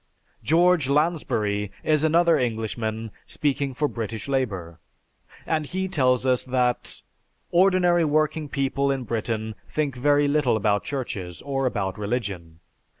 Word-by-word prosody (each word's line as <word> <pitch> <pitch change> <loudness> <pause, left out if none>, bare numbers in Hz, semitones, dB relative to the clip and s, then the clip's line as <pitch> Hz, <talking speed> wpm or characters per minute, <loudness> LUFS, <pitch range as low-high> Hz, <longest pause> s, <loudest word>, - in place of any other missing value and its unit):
George 170 -3 +3
Lansbury 110 - 0
is 155 -1 +2
another 170 +2 +4
Englishman 110 -2 -2 0.2
speaking 140 -2 -1
for 150 - +1
British 110 -4 -5
Labor, 95 -12 -2 0.7
and 155 -2 -1
he 190 +3 -2
tells 130 -8 +2
us 130 -1 +2
that, 125 -1 -1 0.5
"Ordinary 180 -1 +4
working 155 0 0
people 140 0 0
in 135 -2 -1
Britain 110 -1 -3 0.2
think 145 -4 -1
very 145 +3 +3
little 140 -6 +2
about 105 -1 +1
Churches, 100 - -5
or 135 -2 -1
about 95 -5 -2
religion. 100 -7 -4
130 Hz, 125 wpm, -24 LUFS, 110-150 Hz, 0.7 s, another